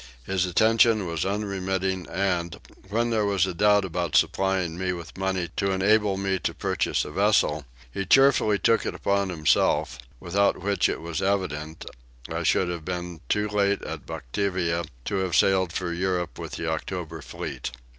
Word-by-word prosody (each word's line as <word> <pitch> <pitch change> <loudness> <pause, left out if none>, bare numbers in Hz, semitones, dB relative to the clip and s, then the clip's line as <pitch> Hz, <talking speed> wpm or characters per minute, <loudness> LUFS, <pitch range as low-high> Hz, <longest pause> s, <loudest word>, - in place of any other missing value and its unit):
His 95 -1 0
attention 110 +2 +4
was 85 -1 -2
unremitting 95 -2 -2
and, 90 -3 -1 0.3
when 115 +3 0
there 110 -2 +2
was 100 -3 +2
a 95 - -3
doubt 105 +2 +4
about 85 -4 -2
supplying 95 +3 +2
me 90 +1 -1
with 85 -2 -9
money 95 -2 -1
to 100 - +1
enable 100 +1 +2
me 95 -1 -1
to - - -3
purchase - - 0
a - - -7
vessel, 90 -6 +2 0.3
he 95 - -3
cheerfully 120 -1 +4
took 115 +2 +2
it - - -3
upon 100 -1 0
himself; 75 -7 +1 0.2
without 100 +3 +1
which 100 +2 +1
it - - -3
was 80 -2 -4
evident, 80 -6 -2 0.4
I - - -3
should 95 - +2
have 85 -2 -4
been 90 -1 -5
too 105 0 +1
late 100 -1 +1
at - - -7
Batavia 85 +3 -2 0.2
to 100 - -2
have 95 -2 -1
sailed 95 -3 +3
for 85 0 -3
Europe 90 -1 -2
with - - -7
the 85 - -4
October 80 0 -4
fleet. 70 - -6
95 Hz, 165 wpm, -25 LUFS, 85-100 Hz, 0.4 s, attention